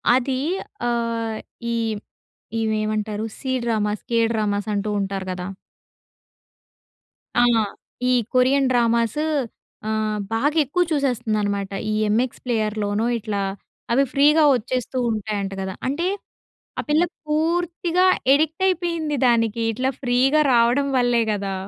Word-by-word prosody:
అది 260 0 0 0.5
ఆహ్, 230 -2 -1 0.4
ఈ - - 0 0.8
ఈమె 220 -1 0
ఏమంటారు 215 0 -2 0.2
సీ 265 - -3
డ్రామాస్, 215 -2 -1
కే 230 - +3
డ్రామాస్ 205 -1 -1
అంటూ 205 +1 -1
ఉంటారు 195 -1 -3
కదా! 180 0 -5 1.9
ఆ! - - +4 0.7
ఈ - - +4 0.2
కొరియన్ 260 +2 +4
డ్రామాస్ 235 +1 +2 0.7
ఆహ్, 215 -1 -1
బాగా 290 +8 +1
ఎక్కువ 325 +6 +1
చూసేస్తుందన్నమాట. 215 -8 0 0.2
ఈ - - 0 0.2
ఎంఎక్స్ 240 +4 0
ప్లేయర్‌లోనో, 215 -2 0
ఇట్లా 205 -2 -3 0.5
అవి 265 +4 +4
ఫ్రీగా 300 +3 +5
వచ్చేస్తూ 250 +2 -3
ఉంటాయంట 210 -2 -2
కదా! 190 0 -4
అంటే, 325 +7 -1 0.7
ఆ - - 0
పిల్ల 305 +3 +4 0.2
పూర్తిగా 340 +3 +1 0.3
అడిక్ట్ 315 +5 +2
అయిపోయింది 335 -5 0
దానికి. 230 -1 +2
ఇట్లా 255 +4 0
ఫ్రీగా 260 +4 +3
రావడం 240 +4 +3
వల్లే 245 -1 +3
కదా! 200 -1 -2
235 Hz, 115 wpm, -22 LUFS, 215-280 Hz, 1.9 s, ఫ్రీగా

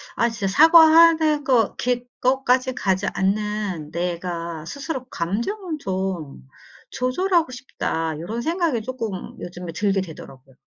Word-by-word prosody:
아 235 - +2
진짜 210 -4 -3
사과하는 320 - +6
거 245 -6 +2
게 245 0 -1 0.2
거까지 255 0 +2
가지 190 0 0
않는 200 -5 -2
'내가 170 -2 -4
스스로 275 - -5
감정을 300 - -3
좀 185 - -4 0.4
조절하고 335 +4 +1
싶다.' 165 - -3
요런 220 +7 -4
생각이 325 -4 0
쪼끔 225 -6 -5
요즘에 175 -1 -7
들게 200 +1 +1
되더라고요. 135 -7 -9
220 Hz, 270 characters per minute, -22 LUFS, 180-270 Hz, 0.4 s, 사과하는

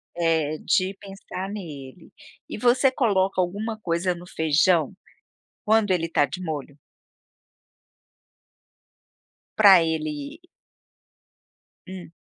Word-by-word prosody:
É, 160 -3 0
de 185 +1 0
pensar 195 -1 -8
nele. 160 -6 -9 0.4
E - - -6
você 250 +3 +3
coloca 195 -7 +1
alguma 215 +5 -4
coisa 175 -1 -1
no 175 +1 -11
feijão 160 0 +1 0.7
quando 220 -2 +2
ele 165 -2 0
tá 145 - +2
de 185 - -7
molho? 145 -4 -6 2.8
Pra 195 -5 +7
ele 155 - -4 1.5
Hum. 185 -3 -10
180 Hz, 95 wpm, -24 LUFS, 160-200 Hz, 2.8 s, Pra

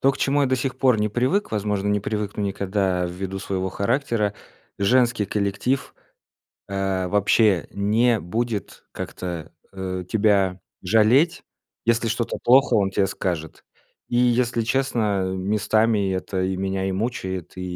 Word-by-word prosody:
То 135 - +4
к - - -9
чему 145 +1 +2
я - - +3
до 130 - +2
сих 130 +1 -3
пор 125 -4 +3
не 105 - +1
привык, 130 - 0
возможно, 105 -1 -1
не 105 0 +1
привыкну 105 0 -3
никогда 95 -2 0
ввиду 95 +2 -5
своего 95 -1 -2
характера: 110 0 0 0.4
женский 120 +1 +3
коллектив, 105 +7 -1 0.7
э, 95 -2 -1
вообще 100 -1 +3
не 110 +4 +2
будет 110 +4 -4
как-то, 85 -3 -6 0.2
э, 95 -1 -4
тебя 100 -4 +2 0.2
жалеть, 115 - +3 0.4
если 115 0 +2
что-то 115 +1 -2
плохо- 130 +3 +5
он 100 -2 +2
те 95 0 +1
скажет. 85 -4 -4 0.5
И 120 - -2
если 120 -1 +2
честно, 115 -5 0
местами 105 +1 +1
это 95 0 -2
и 95 0 -1
меня, 95 0 -2
и - - -1
мучает, 95 -4 -3
и 90 - -5
105 Hz, 140 wpm, -23 LUFS, 95-120 Hz, 0.7 s, плохо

